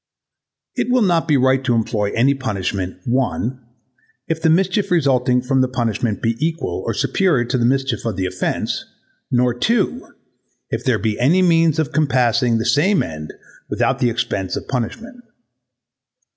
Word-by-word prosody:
It - - -1
will 250 -2 +3
not 170 -4 +1
be 150 -3 +3
right 130 +1 +2
to 120 -2 +1
employ 105 -2 -1
any 130 +5 +3
punishment, 100 -7 -3
1. 125 0 -1 0.6
if 160 0 -2
the 160 - +3
mischief 190 +4 +2
resulting 130 -7 +2
from 130 0 +1
the 130 - +2
punishment 115 -3 -2
be 115 0 +1
equal 165 0 -2
or - - -1
superior 165 -11 +1
to 125 - -1
the 120 - +2
mischief 135 +1 0
of 115 -4 -2
the 95 - -2
offence, 90 0 -2 0.5
nor 125 0 +2
2. 230 - 0 0.6
if - - -2
there 125 -5 +2
be 105 0 -2
any 165 +10 +3
means 165 -3 +3
of 155 -2 -1
compassing 125 -5 +2
the 115 - -2
same 185 +7 +3
end 75 -1 -7 0.4
without - - 0
the 125 - +2
expense 105 -5 -2
of - - -6
punishment. 230 - -5
130 Hz, 160 wpm, -19 LUFS, 115-160 Hz, 0.6 s, will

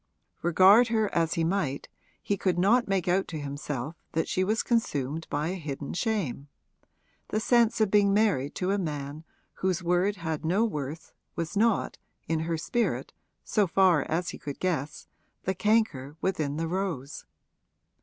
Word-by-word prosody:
Regard 190 +7 +6
her 220 -3 0
as 165 -1 +1
he 165 - +1
might 160 -6 -1 0.4
he 200 - 0
could 185 -2 0
not 230 +7 +3
make 195 -3 0
out 185 +2 +2
to 160 - -5
himself 145 0 -4 0.2
that 160 - 0
she 185 - 0
was 215 +4 +1
consumed 160 - -1
by 150 +3 -1
a - - -2
hidden 145 -2 -5
shame; 180 - -2 0.8
the 215 - -1
sense 235 0 +3
of 215 -3 +2
being 205 -1 +4
married 195 -10 +1
to 185 +1 -1
a 200 - +1
man 150 -3 -4 0.3
whose 185 -1 -1
word 180 +4 +2
had 160 -4 -4
no 190 +8 +2
worth 155 -5 -5 0.2
was 170 +4 -4
not, 220 +1 +1 0.3
in 160 -1 0
her 165 +1 -1
spirit, 235 +9 -1 0.3
so 210 -3 +1
far 180 -3 +4
as 175 +3 -1
he - - -7
could 145 -1 -6
guess, 155 -6 -2 0.4
the 190 - 0
canker 190 -10 +1
within 155 -6 -1
the 165 0 -1
rose. 165 -6 -4
175 Hz, 165 wpm, -28 LUFS, 150-200 Hz, 0.8 s, Regard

